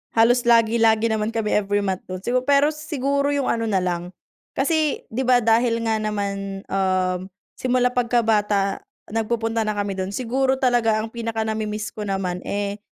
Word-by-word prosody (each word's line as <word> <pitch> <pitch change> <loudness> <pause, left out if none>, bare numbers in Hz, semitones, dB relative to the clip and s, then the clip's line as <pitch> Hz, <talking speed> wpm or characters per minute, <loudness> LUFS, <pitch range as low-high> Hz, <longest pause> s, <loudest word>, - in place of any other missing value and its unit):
halos 240 +2 +4
lagi, 230 -1 +4
lagi 225 0 +3
naman 215 -1 0
kami 220 -2 -1
every 205 0 +1
month 190 -2 -1
do'n. 185 0 -6
Sigu 250 +3 +1
pero 285 +1 +4
siguro 285 -2 -1
yung 280 -2 0
ano 230 -1 -1
na 195 -4 +1
lang 175 0 -3 0.4
kasi 305 +1 +1
'di 255 +4 -2
ba 250 -1 +5
dahil 230 +1 +2
nga 225 -1 +1
naman, 200 -2 -3
um, 185 -1 0 0.3
simula 250 -1 +2
pagkabata 215 -5 +1 0.3
nagpupunta 225 0 -1
na 215 - -1
kami 205 -1 -2
do'n. 190 +2 -3
Siguro 260 +3 +1
talaga 240 -4 +2
ang 225 - -7
pinaka-namimiss 220 -2 -3
ko 210 -1 -6
naman, 190 -2 -2
eh, 200 0 -2
220 Hz, 160 wpm, -22 LUFS, 200-245 Hz, 0.4 s, ba